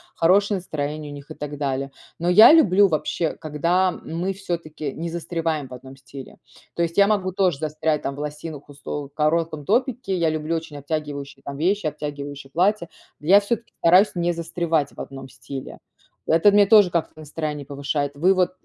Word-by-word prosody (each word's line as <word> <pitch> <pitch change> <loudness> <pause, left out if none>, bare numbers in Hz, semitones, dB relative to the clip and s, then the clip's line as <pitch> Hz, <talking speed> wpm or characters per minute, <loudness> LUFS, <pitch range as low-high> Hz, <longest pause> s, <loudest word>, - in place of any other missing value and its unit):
хорошее 200 +4 +3
настроение 150 -3 -5
у - - -8
них 145 +2 -12
и - - -4
так 145 0 -6
далее. 135 -1 -2 0.3
Но 170 - -2
я 215 +9 +9
люблю 205 - +5
вообще, 160 0 -1
когда 170 +5 +1
мы 175 +3 -4
всё-таки 170 -6 -5
не 165 +5 -5
застреваем 165 -3 -3
в - - -10
одном 130 +1 -11
стиле. 135 0 -12 0.4
То 170 - +1
есть 165 0 -3
я 200 0 +6
могу 200 -3 0
тоже 185 -6 +1
застрять 155 0 -1
там 140 - -4
в - - -10
лосинах, 150 0 -7
усло 145 0 -6
в 140 - -30
коротком 155 0 0
топике, 245 - 0
я 165 -2 +2
люблю 155 +1 -2
очень 160 -2 -6
обтягивающие 145 -2 -5
там 140 0 -7
вещи, 185 +5 0
обтягивающие 145 -2 -5
платья. 180 +2 +1 0.3
Я 185 +7 +6
всё-таки 225 +3 -3
стараюсь 180 +5 +5
не 175 0 +1
застревать 165 -3 -1
в - - -15
одном 135 -1 -8
стиле. 130 +1 -8 0.5
Это 165 +6 +5
мне 205 0 +6
тоже 205 -2 +6
как-то 170 -2 -1
настроение 150 -1 -5
повышает. 140 +1 -2
Вы 180 +7 +3
вот, 185 -1 +1
160 Hz, 180 wpm, -23 LUFS, 145-180 Hz, 0.5 s, я